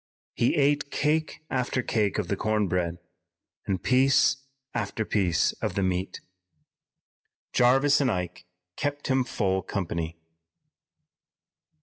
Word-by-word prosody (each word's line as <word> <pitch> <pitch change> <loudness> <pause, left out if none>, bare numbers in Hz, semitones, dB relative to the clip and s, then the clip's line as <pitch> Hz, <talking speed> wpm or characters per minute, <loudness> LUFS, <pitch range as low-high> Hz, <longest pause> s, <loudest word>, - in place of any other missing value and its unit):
He 120 - +1
ate 145 -1 +2
cake 155 +2 0
after 125 0 0
cake 105 -3 0
of 105 -4 -1
the 100 - 0
corn 105 0 0
bread 85 -1 -1 0.7
and 95 -2 -1
piece 130 +1 +4 0.4
after 110 -1 -2
piece 95 -6 +2
of - - -2
the 100 - +1
meat. 95 0 -2 1.3
Jarvis 135 +4 +4
and 135 - +2
Ike 90 -3 -3 0.3
kept 145 0 -3
him 130 -1 +3
full 95 -5 -1
company. 85 -3 -3
110 Hz, 115 wpm, -27 LUFS, 95-135 Hz, 1.3 s, piece